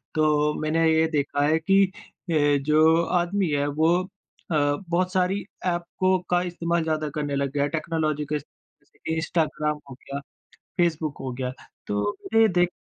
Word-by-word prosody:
तो 150 -1 +3
मैंने 160 +1 +1
ये 160 0 +3
देखा 145 -1 0
है 155 +1 +3
कि 195 +5 +4 0.5
ए 145 -2 +3
जो 155 +2 +5 0.2
आदमी 180 0 0
है 145 -1 +1
वो 160 +4 +2
अ, - - -10 0.5
बहुत 170 +5 +1
सारी 190 +1 +1 0.2
ऐप 175 -1 0 0.2
को 185 0 +4
का 175 0 +3
इस्तेमाल 170 -1 0
ज़्यादा 155 -1 -1
करने 145 -2 -2
लग 140 -1 -1
गया 140 - +1
है 145 - 0
टेक्नोलॉज़ी 155 -1 -1
केस 150 -1 -3 0.7
इंस्टाग्राम 155 -2 -1
हो - - -8
गया, 140 +2 -7 0.6
फेसबुक 160 -4 0
हो 130 -1 -4
गया। 125 0 -3 0.4
तो 105 0 -1 0.2
मैंने 225 0 +3
ये 220 - +6
देख 175 -1 +2
155 Hz, 165 wpm, -25 LUFS, 145-175 Hz, 0.7 s, ये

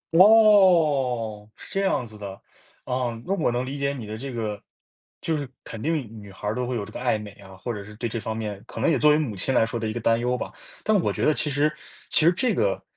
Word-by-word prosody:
哦， 160 - +5
是 - - -12
这 195 - +1
样 130 -9 +1
子 110 -1 -12
的。 100 -2 -7 0.5
啊， 125 -2 -2
那 195 - 0
我 160 -10 +1
能 125 +1 -1
理 140 +2 -5
解 140 0 0
你 120 -6 -7
的 105 +1 -6
这 135 +2 -6
个 110 -3 -4 0.6
就 160 - 0
是 140 -4 -5
肯 110 -1 -8
定 160 +3 0 0.3
女 100 -1 -12
孩 105 +2 -5
儿 - - 0
都 125 -1 -2
会 125 - -2
有 110 - -2
这 110 - -12
个 - - -7
爱 125 -3 +1
美 105 -1 -8
啊， 95 -2 -14
或 115 +5 -5
者 105 - -6
是 105 +1 -12
对 120 +2 -3
这 115 - -3
方 110 +1 -4
面 105 -3 -4
可 - - -8
能 165 - +3
也 - - +2
作 150 - +5
为 150 - +5
母 130 -10 -2
亲 130 +7 +1
来 115 - +5
说 115 0 -4
的 110 - -2
一 110 - -3
个 120 - -3
担 115 0 +3
忧 125 +1 0
吧， - - -5 0.3
但 215 -2 +3
我 - - 0
觉 - - -1
得 155 - +4
其 150 - 0
实 145 +2 +2 0.4
其 155 - +3
实 170 - +7
这 230 +6 +1
个 - - 0
125 Hz, 290 characters per minute, -25 LUFS, 110-150 Hz, 0.6 s, 实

